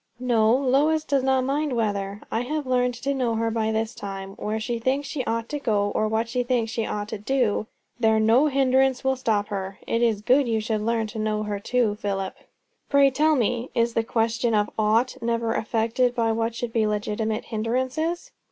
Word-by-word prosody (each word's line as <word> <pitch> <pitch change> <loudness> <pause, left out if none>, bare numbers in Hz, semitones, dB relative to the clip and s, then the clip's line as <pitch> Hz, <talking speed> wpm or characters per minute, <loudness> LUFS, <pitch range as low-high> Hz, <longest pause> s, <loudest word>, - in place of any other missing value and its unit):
"No. 230 -3 +3
Lois 280 +4 +2
does 280 -3 +1
not 265 0 +2
mind 285 +2 -1
weather. 205 -3 -2
I 225 - 0
have 295 +4 -3
learned 250 -1 +1
to 275 +4 -2
know 250 -4 0
her 225 0 0
by 220 -1 0
this 220 +1 -1
time. 195 -2 -6
Where 215 +1 -2
she 235 +1 -3
thinks 270 +4 0
she 280 -2 -3
ought 230 0 -2
to 295 - -3
go, 205 -6 0
or 215 - +1
what 220 +1 0
she 250 +2 -1
thinks 240 -2 0
she 225 -1 -2
ought 205 0 -3
to 220 - -5
do, 220 -2 0 0.3
there 220 -2 +3
no 230 +7 +4
hindrance 265 -2 +2
will 265 0 +2
stop 215 -5 0
her. 195 -1 -4
It 230 - 0
is 220 -3 +1
good 260 +3 +4
you 225 -1 +1
should 215 0 -2
learn 225 +1 0
to 220 +1 -7
know 215 0 -1
her 205 -1 -3
too, 225 -1 0
Philip." 195 -2 -2 0.6
"Pray 280 -1 +5
tell 310 +4 +3
me, 240 0 0
is 235 0 +2
the 230 - +1
question 225 0 0
of 210 0 +1
'ought' 220 +4 +1
never 230 -1 0
affected 230 +3 0
by 230 -2 +1
what 225 +1 -1
should 235 -1 -4
be 220 -2 +2
legitimate 215 +1 -2
hindrances?" 260 - -1
230 Hz, 205 wpm, -24 LUFS, 215-255 Hz, 0.6 s, Pray